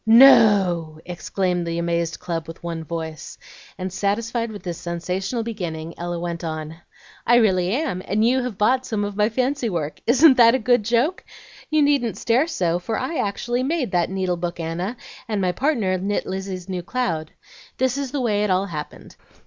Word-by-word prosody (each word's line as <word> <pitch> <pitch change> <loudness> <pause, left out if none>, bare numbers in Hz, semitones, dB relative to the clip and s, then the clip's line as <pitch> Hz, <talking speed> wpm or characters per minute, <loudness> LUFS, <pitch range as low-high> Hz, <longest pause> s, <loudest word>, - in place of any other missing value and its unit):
"No!" 205 -9 +6
exclaimed 180 0 -2
the 165 0 -2
amazed 170 -1 -1
club 165 -2 -4
with 165 +1 -10
one 165 -1 -4
voice; 160 -1 -6 0.4
and, 185 -1 -4
satisfied 225 +4 -1
with 205 - -9
this 175 -2 -5
sensational 180 +7 -3
beginning 170 -8 -5
Ella 175 0 -4
went 170 0 -4
on. 155 -1 -5 0.5
"I 240 - +6
really 185 -6 +3
am, 265 - -1
and 215 +3 +2
you 260 +2 +3
have 245 -5 -4
bought 250 +5 +3
some 215 -4 -2
of 205 -1 -5
my 210 +1 +2
fancy 255 +1 0
work. 160 -5 -3
Isn't 265 +3 +6
that 235 0 +7
a - - +3
good 245 0 +3
joke? 240 - +1 0.5
You 310 -1 +3
needn't 280 -6 +1
stare 250 +7 +2
so, 175 - 0
for 220 +5 -3
I 275 +5 -3
actually 240 +4 -1
made 270 - -1
that 175 -2 +1
needle 185 -2 -1
book, 170 0 -4
Anna, 175 +8 -3 0.3
and 215 -3 -1
my 185 -2 +1
partner 220 - 0
knit 200 +2 -1
Lizzie's 190 -1 -5
new 185 -2 -3
cloud. 170 -7 -2 0.5
This 260 -1 +1
is 280 -1 -3
the 285 -1 -2
way 210 -4 +1
it 210 - 0
all 185 +1 +2
happened. 155 -6 -8
195 Hz, 185 wpm, -22 LUFS, 170-240 Hz, 0.5 s, that